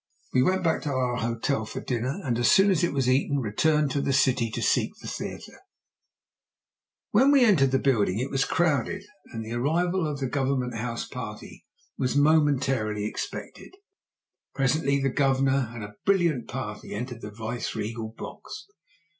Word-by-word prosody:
We 125 Hz, -, +4 dB
went 185 Hz, +6 st, +2 dB
back 160 Hz, -2 st, +1 dB
to 150 Hz, -, -3 dB
our 125 Hz, -2 st, 0 dB
hotel 115 Hz, +1 st, -1 dB
for 110 Hz, -, -6 dB
dinner, 125 Hz, -, -2 dB
and 120 Hz, -5 st, -1 dB
as 120 Hz, -, +3 dB
soon 195 Hz, +1 st, +6 dB
as 175 Hz, -4 st, +1 dB
it 175 Hz, -, +2 dB
was 135 Hz, -3 st, 0 dB
eaten 140 Hz, +2 st, +2 dB
returned 145 Hz, +5 st, +1 dB
to 140 Hz, -, 0 dB
the 135 Hz, -, 0 dB
city 130 Hz, -3 st, +2 dB
to 110 Hz, -, -4 dB
seek -, -, +1 dB
the -, -, -11 dB
theatre. -, -, -7 dB, 1.5 s
When 255 Hz, +7 st, +5 dB
we 275 Hz, -3 st, +6 dB
entered 185 Hz, -11 st, +5 dB
it 130 Hz, -, 0 dB
the -, -, +5 dB
building 115 Hz, -2 st, +2 dB
was 135 Hz, -1 st, +2 dB
crowded, 170 Hz, -, 0 dB, 0.2 s
and 115 Hz, -2 st, -6 dB
the 110 Hz, -, -5 dB
arrival 165 Hz, +7 st, +1 dB
of 145 Hz, -2 st, -4 dB
the 135 Hz, -, -1 dB
Government 130 Hz, -2 st, -1 dB
House 115 Hz, +1 st, -3 dB
party -, -, -8 dB, 0.3 s
was 130 Hz, 0 st, 0 dB
momentarily 135 Hz, -8 st, +2 dB
expected. 110 Hz, -, -6 dB, 0.8 s
Presently 140 Hz, +1 st, +1 dB
the 135 Hz, 0 st, +1 dB
Governor 135 Hz, -2 st, +2 dB
and 115 Hz, -2 st, -7 dB
a 105 Hz, 0 st, -8 dB
brilliant 170 Hz, -, +2 dB
party 105 Hz, -5 st, -6 dB
entered 120 Hz, +1 st, -5 dB
the 105 Hz, -, -6 dB
vice 110 Hz, +3 st, -5 dB
regal 110 Hz, +1 st, -4 dB
box. 115 Hz, -, -9 dB
135 Hz, 170 wpm, -26 LUFS, 115-150 Hz, 1.5 s, soon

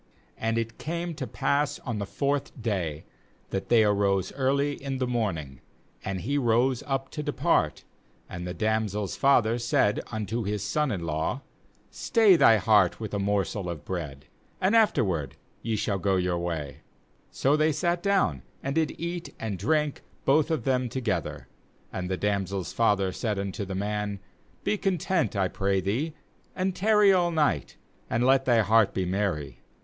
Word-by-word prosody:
5And 115 Hz, 0 st, 0 dB
it 115 Hz, 0 st, -3 dB
came 170 Hz, +2 st, -3 dB
to 135 Hz, -4 st, -5 dB
pass 140 Hz, +5 st, 0 dB
on 120 Hz, -5 st, -4 dB
the 100 Hz, -, -3 dB
fourth 140 Hz, +1 st, -2 dB
day, 90 Hz, -9 st, -2 dB, 0.5 s
that 95 Hz, -, -3 dB
they 115 Hz, -2 st, +6 dB
arose 100 Hz, -2 st, +1 dB
early 140 Hz, +2 st, +1 dB
in 135 Hz, -1 st, -2 dB
the 130 Hz, -, 0 dB
morning, 95 Hz, -, -2 dB, 0.4 s
and 95 Hz, -2 st, -3 dB
he 140 Hz, +8 st, 0 dB
rose 120 Hz, +1 st, +2 dB
up 135 Hz, -1 st, -2 dB
to 150 Hz, -, -4 dB
depart; -, -, 0 dB, 0.4 s
and 90 Hz, -1 st, -6 dB
the 90 Hz, -, -4 dB
damsel's 110 Hz, -2 st, -1 dB
father 120 Hz, -4 st, +3 dB
said 110 Hz, -3 st, +2 dB
unto 110 Hz, +1 st, -2 dB
his 105 Hz, 0 st, -2 dB
son 150 Hz, +6 st, 0 dB
in 85 Hz, -5 st, -3 dB
law: 80 Hz, -, -2 dB, 0.5 s
'Stay 220 Hz, -6 st, +4 dB
thy 115 Hz, -9 st, +6 dB
heart 105 Hz, -3 st, +3 dB
with 110 Hz, -2 st, -6 dB
a 100 Hz, -, 0 dB
morsel 100 Hz, -1 st, -1 dB
of 75 Hz, -4 st, -6 dB
bread, 75 Hz, -7 st, -5 dB, 0.3 s
and 190 Hz, +4 st, +2 dB
afterward 100 Hz, -, +2 dB, 0.3 s
ye 115 Hz, -1 st, -1 dB
shall 100 Hz, -1 st, -1 dB
go 95 Hz, +1 st, +1 dB
your 90 Hz, -1 st, 0 dB
way/ 80 Hz, -4 st, -4 dB, 0.5 s
6So 140 Hz, +2 st, +2 dB
they 155 Hz, +1 st, +3 dB
sat 170 Hz, +3 st, 0 dB
down, 190 Hz, -, +1 dB, 0.2 s
and 135 Hz, -, -2 dB
did 160 Hz, -1 st, 0 dB
eat 170 Hz, +1 st, -5 dB
and 110 Hz, -3 st, -3 dB
drink, 150 Hz, -, 0 dB, 0.2 s
both 150 Hz, +3 st, +3 dB
of 160 Hz, -2 st, -1 dB
them 130 Hz, -2 st, +1 dB
to 130 Hz, -, -3 dB
gether; 95 Hz, -, -3 dB, 0.5 s
and 90 Hz, -1 st, -3 dB
the 95 Hz, -, -1 dB
damsel's 100 Hz, -3 st, -2 dB
father 100 Hz, -4 st, +2 dB
said 105 Hz, +1 st, -2 dB
unto 100 Hz, +1 st, -3 dB
the 95 Hz, 0 st, -5 dB
man: 105 Hz, 0 st, -2 dB, 0.4 s
'Be 210 Hz, -, 0 dB
content, 185 Hz, -, 0 dB
I 95 Hz, -1 st, +2 dB
pray 95 Hz, +1 st, 0 dB
thee, 120 Hz, -, -2 dB, 0.4 s
and 185 Hz, 0 st, -1 dB
tarry 210 Hz, 0 st, +5 dB
all 175 Hz, -2 st, +3 dB
night, 150 Hz, -, 0 dB, 0.3 s
and 120 Hz, +2 st, +1 dB
let 135 Hz, 0 st, +4 dB
thy 120 Hz, -3 st, +4 dB
heart 110 Hz, 0 st, +3 dB
be 95 Hz, -, 0 dB
merry. 90 Hz, -7 st, -2 dB
110 Hz, 170 wpm, -27 LUFS, 95-140 Hz, 0.5 s, they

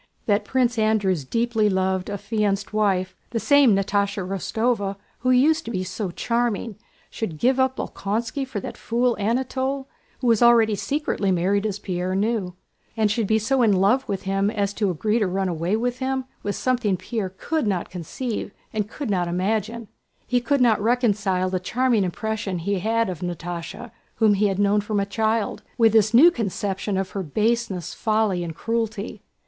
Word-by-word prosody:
That 205 Hz, -1 st, +1 dB
Prince 245 Hz, -1 st, +1 dB
Andrew's 205 Hz, -7 st, +2 dB
deeply 230 Hz, -, +1 dB
loved 190 Hz, 0 st, 0 dB
affianced 205 Hz, 0 st, -1 dB
wife—the 200 Hz, +1 st, -1 dB
same 280 Hz, -4 st, +5 dB
Natásha 200 Hz, -1 st, 0 dB
Rostóva 200 Hz, +1 st, -1 dB, 0.2 s
who 255 Hz, -, 0 dB
used 305 Hz, +6 st, +4 dB
to -, -, -5 dB
be 185 Hz, -5 st, -2 dB
so 185 Hz, +2 st, -4 dB
charming—should 225 Hz, -3 st, -3 dB
give 255 Hz, -, +2 dB
up 260 Hz, 0 st, +2 dB
Bolkónski 225 Hz, +7 st, -3 dB
for 235 Hz, -5 st, -4 dB
that -, -, -7 dB
fool 240 Hz, +1 st, +1 dB
Anatole 260 Hz, +5 st, -1 dB, 0.3 s
who -, -, -6 dB
was 230 Hz, -2 st, +4 dB
already 235 Hz, -2 st, +6 dB
secretly 240 Hz, -3 st, -1 dB
married 195 Hz, +4 st, +1 dB
(as 205 Hz, -2 st, -3 dB
Pierre 185 Hz, -2 st, -3 dB
knew), 200 Hz, -3 st, -1 dB, 0.4 s
and 215 Hz, -2 st, +2 dB
should 220 Hz, -1 st, 0 dB
be 220 Hz, -, +3 dB
so 255 Hz, +5 st, +1 dB
in 220 Hz, -4 st, +4 dB
love 200 Hz, +8 st, +2 dB
with 195 Hz, -2 st, -2 dB
him 195 Hz, +1 st, +1 dB
as 205 Hz, -2 st, -1 dB
to 205 Hz, -1 st, 0 dB
agree 210 Hz, +7 st, 0 dB
to 210 Hz, -, +1 dB
run 190 Hz, +1 st, -1 dB
away 170 Hz, +3 st, -1 dB
with 245 Hz, +2 st, -1 dB
him, 265 Hz, 0 st, -1 dB, 0.2 s
was 205 Hz, -, -2 dB
something 245 Hz, -7 st, +1 dB
Pierre 190 Hz, -1 st, -4 dB
could 315 Hz, -1 st, -1 dB
not 190 Hz, -4 st, -1 dB
conceive 200 Hz, +7 st, -4 dB, 0.2 s
and 210 Hz, -1 st, -2 dB
could 270 Hz, -2 st, -4 dB
not 180 Hz, -3 st, +1 dB
imagine. 215 Hz, +6 st, -1 dB, 0.4 s
He 245 Hz, -1 st, +1 dB
could 275 Hz, +3 st, +1 dB
not 230 Hz, -4 st, +4 dB
reconcile 205 Hz, -6 st, +1 dB
the 185 Hz, -, 0 dB
charming 235 Hz, +3 st, +1 dB
impression 200 Hz, +1 st, -3 dB
he 195 Hz, +3 st, -1 dB
had 225 Hz, +3 st, +1 dB
of 185 Hz, -3 st, -4 dB
Natásha, 175 Hz, +5 st, -5 dB, 0.2 s
whom 220 Hz, -2 st, +4 dB
he 205 Hz, +1 st, +2 dB
had 195 Hz, -2 st, -1 dB
known 205 Hz, +1 st, +3 dB
from 210 Hz, 0 st, -1 dB
a 200 Hz, -, +1 dB
child, 220 Hz, +1 st, -1 dB, 0.2 s
with 225 Hz, -3 st, +4 dB
this 215 Hz, -1 st, +4 dB
new 290 Hz, +10 st, +8 dB
conception 200 Hz, -, -2 dB
of 190 Hz, -1 st, -2 dB
her 195 Hz, -, -3 dB
baseness, 210 Hz, +1 st, -1 dB
folly, 215 Hz, -5 st, +1 dB
and 165 Hz, -2 st, -5 dB
cruelty. 225 Hz, -1 st, -3 dB
210 Hz, 175 wpm, -23 LUFS, 195-235 Hz, 0.4 s, new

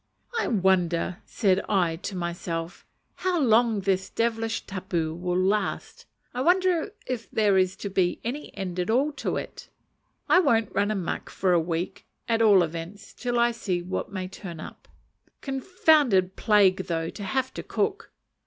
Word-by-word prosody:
"I -, -, 0 dB
wonder," 180 Hz, -4 st, +1 dB
said 195 Hz, -4 st, +2 dB
I 180 Hz, -5 st, +2 dB
to 190 Hz, +3 st, -6 dB
myself, 170 Hz, -1 st, -4 dB, 0.3 s
"how 365 Hz, -2 st, 0 dB
long 230 Hz, -4 st, +3 dB
this 190 Hz, 0 st, 0 dB
devilish 225 Hz, -1 st, -1 dB
tapu 180 Hz, -4 st, -2 dB
will 180 Hz, +1 st, -2 dB
last! 195 Hz, +3 st, -1 dB, 0.3 s
I 250 Hz, -, -2 dB
wonder 360 Hz, +3 st, +2 dB
if 245 Hz, -3 st, -4 dB
there 210 Hz, -3 st, +2 dB
is 185 Hz, 0 st, +2 dB
to 200 Hz, -, -5 dB
be 185 Hz, -2 st, +1 dB
any 265 Hz, +6 st, -4 dB
end 185 Hz, -2 st, -4 dB
at 180 Hz, -, -1 dB
all 265 Hz, +7 st, +2 dB
to -, -, -1 dB
it! -, -, -7 dB, 0.6 s
I 365 Hz, -, +6 dB
won't 230 Hz, -, +2 dB
run 200 Hz, +1 st, +1 dB
a 215 Hz, -, 0 dB
muck 185 Hz, -4 st, -3 dB
for 185 Hz, -2 st, +1 dB
a 175 Hz, -, +5 dB
week, 165 Hz, +1 st, -3 dB, 0.2 s
at 230 Hz, -1 st, +1 dB
all 205 Hz, -5 st, +6 dB
events, 170 Hz, +5 st, -7 dB
till 245 Hz, -1 st, -2 dB
I 235 Hz, 0 st, +4 dB
see 185 Hz, -6 st, -2 dB
what 185 Hz, +3 st, -4 dB
may 185 Hz, -2 st, -4 dB
turn 185 Hz, -3 st, -8 dB
up. -, -, -10 dB, 0.5 s
Confounded 270 Hz, -, +2 dB
plague 195 Hz, -3 st, +3 dB
though 165 Hz, -1 st, -2 dB
to 205 Hz, -, -8 dB
have 260 Hz, +6 st, -1 dB
to -, -, -5 dB
cook!" 410 Hz, +1 st, -2 dB
195 Hz, 165 wpm, -26 LUFS, 180-235 Hz, 0.6 s, I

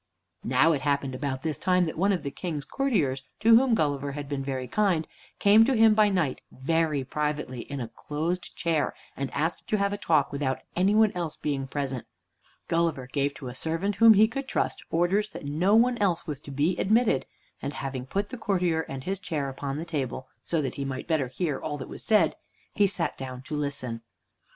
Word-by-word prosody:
Now 130 Hz, +7 st, +4 dB
it 145 Hz, -4 st, 0 dB
happened 140 Hz, -2 st, 0 dB
about 130 Hz, 0 st, -3 dB
this 155 Hz, -4 st, -2 dB
time 180 Hz, -1 st, +3 dB
that 160 Hz, -, -4 dB
one 195 Hz, +5 st, +2 dB
of 185 Hz, -, -1 dB
the 140 Hz, -, -3 dB
King's 155 Hz, -3 st, -4 dB
courtiers, 165 Hz, -, 0 dB, 0.2 s
to 225 Hz, +1 st, +7 dB
whom 245 Hz, 0 st, +5 dB
Gulliver 145 Hz, -5 st, 0 dB
had 145 Hz, 0 st, -5 dB
been 140 Hz, -1 st, -3 dB
very 130 Hz, -2 st, -3 dB
kind, 180 Hz, -, +1 dB, 0.3 s
came 210 Hz, +2 st, +6 dB
to 265 Hz, +1 st, +2 dB
him 220 Hz, -1 st, +7 dB
by 210 Hz, -1 st, +5 dB
night 175 Hz, -9 st, 0 dB
very 155 Hz, +1 st, 0 dB
privately 150 Hz, -3 st, -2 dB
in 140 Hz, -, -3 dB
a 120 Hz, -, -3 dB
closed 160 Hz, +9 st, -4 dB
chair, 160 Hz, -4 st, 0 dB, 0.2 s
and 135 Hz, -1 st, -3 dB
asked 165 Hz, +3 st, -2 dB
to 215 Hz, -, +1 dB
have 200 Hz, 0 st, +1 dB
a 205 Hz, -, -4 dB
talk, 155 Hz, -4 st, +2 dB
without 140 Hz, -2 st, -1 dB, 0.2 s
any 190 Hz, +4 st, +3 dB
one 220 Hz, -1 st, +5 dB
else 170 Hz, -4 st, -4 dB
being 140 Hz, -2 st, -2 dB
present. 135 Hz, -3 st, -3 dB, 0.6 s
Gulliver 165 Hz, -6 st, 0 dB
gave 140 Hz, +2 st, -1 dB
to 140 Hz, -6 st, -8 dB
a 125 Hz, -, -6 dB
servant 165 Hz, +9 st, -1 dB
whom 225 Hz, 0 st, +8 dB
he 215 Hz, +2 st, +6 dB
could 270 Hz, +4 st, -5 dB
trust -, -, -1 dB
orders 185 Hz, +6 st, +1 dB
that -, -, -9 dB
no 170 Hz, +9 st, +2 dB
one 240 Hz, +1 st, +4 dB
else 180 Hz, -5 st, +1 dB
was 150 Hz, -5 st, -4 dB
to 145 Hz, -, -12 dB
be 150 Hz, +6 st, +1 dB
admitted, 220 Hz, -, +2 dB, 0.3 s
and 140 Hz, -, -3 dB
having 135 Hz, -3 st, -5 dB
put 200 Hz, +7 st, -2 dB
the 255 Hz, -, -7 dB
courtier 180 Hz, -6 st, +1 dB
and 135 Hz, -1 st, -5 dB
his 190 Hz, +3 st, -2 dB
chair 150 Hz, -7 st, -2 dB
upon 135 Hz, +1 st, -4 dB
the 160 Hz, -, -4 dB
table, 135 Hz, -5 st, -3 dB, 0.2 s
so 165 Hz, -3 st, 0 dB
that 130 Hz, -, -2 dB
he -, -, 0 dB
might 130 Hz, -1 st, -4 dB
better 155 Hz, -5 st, +1 dB
hear 145 Hz, +3 st, -2 dB
all 150 Hz, -2 st, -4 dB
that 130 Hz, -, -7 dB
was -, -, -8 dB
said, 215 Hz, -1 st, +3 dB, 0.4 s
he 205 Hz, -1 st, +4 dB
sat 180 Hz, -3 st, -2 dB
down 130 Hz, -1 st, -6 dB
to 150 Hz, -, -5 dB
listen. 135 Hz, -5 st, -3 dB
155 Hz, 210 wpm, -27 LUFS, 135-195 Hz, 0.6 s, whom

